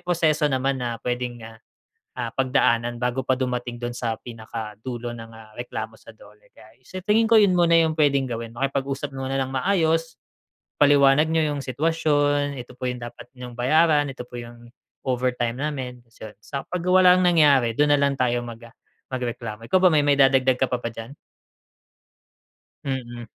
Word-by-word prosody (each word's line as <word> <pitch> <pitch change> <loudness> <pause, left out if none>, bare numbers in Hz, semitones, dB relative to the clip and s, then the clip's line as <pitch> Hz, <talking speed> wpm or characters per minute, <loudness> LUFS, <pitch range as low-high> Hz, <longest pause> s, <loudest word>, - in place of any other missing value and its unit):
proseso 165 -4 +1
naman 135 0 -1
na 120 -2 -3
puwedeng, 125 -1 -3
ah, 110 0 -12 0.6
ah, 115 -2 -3
pagdaanan 120 -3 +1
bago 125 +1 -1
pa 130 -1 0
dumating 125 -2 -3
dun 120 0 -4
sa 115 -2 -3
pinaka 110 -2 -8
dulo 120 -2 -5
ng, 115 -1 -10
ah, 110 -1 -15
reklamo 110 -2 -6
sa 110 - -15
DOLE. 105 -1 -20
Kaya 110 +1 -18
sa 185 +8 -8
tingin 220 +1 +3
ko, 225 - +8
yun 200 -3 +4
muna 170 -1 +4
yung 160 -1 +1
puwedeng 140 -3 +2
gawin, 115 -1 -5
makipag-usap 135 +2 -3
muna 135 0 -2
ng 130 0 -2
maayos, 165 +1 0 0.6
ipaliwanag 145 0 +5
niyo 160 -1 +1
yung 140 - -4
sitwasyon, 145 0 0
ito 125 - -17
po 130 - -4
yung 125 -1 -4
dapat 120 - -9
niyong 125 -1 -10
bayaran, 150 +3 +3
ito 135 -2 -7
po 120 - -8
yung 120 0 -11 0.3
overtime 125 -2 -1
namin, 130 -4 -4
se 105 -3 -12
saka 140 -1 -6
‘pag 175 - -7
walang 185 0 +5
nangyari, 145 -9 +4
dun 150 +2 +2
na 145 - +5
lang 140 0 +2
tayo 120 -2 0
mag 115 0 -9
ah, 115 - -18 0.4
magreklamo. 115 -3 -5
Ikaw 185 - +3
ba 185 - +6
may 150 -2 +3
maidadagdag 135 -2 +4
ka 130 - +2
pa 125 - 0
ba 120 - -6
diyan? 115 +4 -9 1.7
Mm. 120 -3 -5
130 Hz, 175 wpm, -23 LUFS, 120-145 Hz, 1.7 s, ko